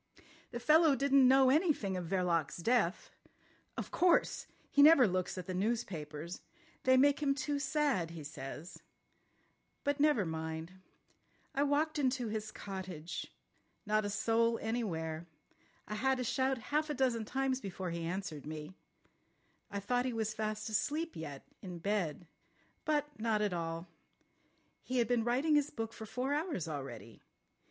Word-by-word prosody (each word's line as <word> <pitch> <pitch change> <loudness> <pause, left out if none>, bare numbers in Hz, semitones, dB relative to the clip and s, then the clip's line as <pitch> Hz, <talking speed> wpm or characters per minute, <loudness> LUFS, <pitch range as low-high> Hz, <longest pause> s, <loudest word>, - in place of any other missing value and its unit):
"The 240 - -5
fellow 310 +3 +5
didn't 275 0 +5
know 265 0 +6
anything 290 - +2
of 180 -2 -3
Verloc's 175 -4 0
death. 215 0 +1 0.7
Of - - -4
course! 355 -1 +3 0.2
He 285 - +5
never 285 -5 +8
looks 185 0 -1
at 180 - -5
the 185 - -4
newspapers. 175 -6 -3 0.4
They 260 0 +6
make 280 +2 +5
him 275 -2 +2
too 285 +1 -1
sad, 280 - +1
he 165 -2 -8
says. 145 +3 -8 1.0
But 285 0 0
never 290 -9 +4
mind. 160 +1 -4 0.8
I 275 - 0
walked 295 +2 +1
into 255 -4 +1
his 215 0 -3
cottage. 185 -5 -6 0.6
Not 215 +1 +2
a 205 - -2
soul 230 +3 +2
anywhere. 170 -8 -3 0.6
I - - -4
had 265 +5 +1
to 250 - -2
shout 260 +2 +1 0.2
half 305 +1 +2
a 295 - -1
dozen 245 -4 +1
times 265 +3 -1
before 185 -2 -4
he 170 0 -3
answered 170 -4 -4
me. 155 +2 -6 1.0
I 200 - -3
thought 245 +5 0
he 255 - -1
was 220 -1 -1
fast 215 0 -3
asleep 295 +10 -1
yet, 145 -4 -7 0.2
in 180 -2 -7
bed. 175 -3 -1 0.6
But 295 -1 +1
not 215 -1 +1
at 205 -3 0
all. 165 0 -3 0.9
He 255 - -3
had 235 -2 +3
been 240 -1 +2
writing 260 +7 +2
his 295 -1 +3
book 225 -3 -5
for 220 -1 -8
four 255 +5 -1
hours 295 - -1
already. 125 -7 -7
220 Hz, 150 wpm, -34 LUFS, 175-270 Hz, 1.0 s, never